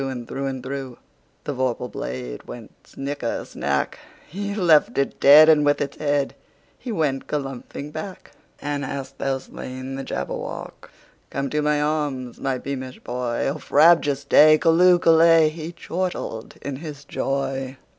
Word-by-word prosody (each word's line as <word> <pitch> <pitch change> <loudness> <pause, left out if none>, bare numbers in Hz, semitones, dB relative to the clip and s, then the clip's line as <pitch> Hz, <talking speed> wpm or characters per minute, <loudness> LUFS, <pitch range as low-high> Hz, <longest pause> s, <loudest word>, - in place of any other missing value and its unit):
And 130 -3 -4
through 135 0 -3
and 130 -2 -4
throughThe 130 -2 -6 0.5
vorpal 130 -4 -2
blade 60 -4 -6
went - - -11
snicker 140 -3 -4
snack! 70 -1 -2 0.3
He 200 +4 -4
left 170 -7 +4
it 140 - -1
dead, 150 +3 +9
and 155 -2 +6
with 145 0 +2
its 140 -1 -3
headHe 145 -2 0 0.5
went 155 - -1
galumphing 140 0 -5
back."And 150 -4 -7
hast 135 0 -6
thou 135 -1 0
slain 130 0 -8
the 135 0 -5
Jabberwock? - - -6 0.4
Come 140 0 -3
to 150 - 0
my 150 0 +1
arms, 145 -5 -2
my 135 -1 -1
beamish 130 -1 -6
boy!O 125 +4 -2
frabjous 145 -3 +4
day! 155 +2 +7
Callooh! 175 +3 +5
Callay!"He 165 -1 +4
chortled 175 -10 -4
in 140 -2 -4
his 145 -2 -9
joy. 135 -1 -3
140 Hz, 135 wpm, -23 LUFS, 130-155 Hz, 0.5 s, dead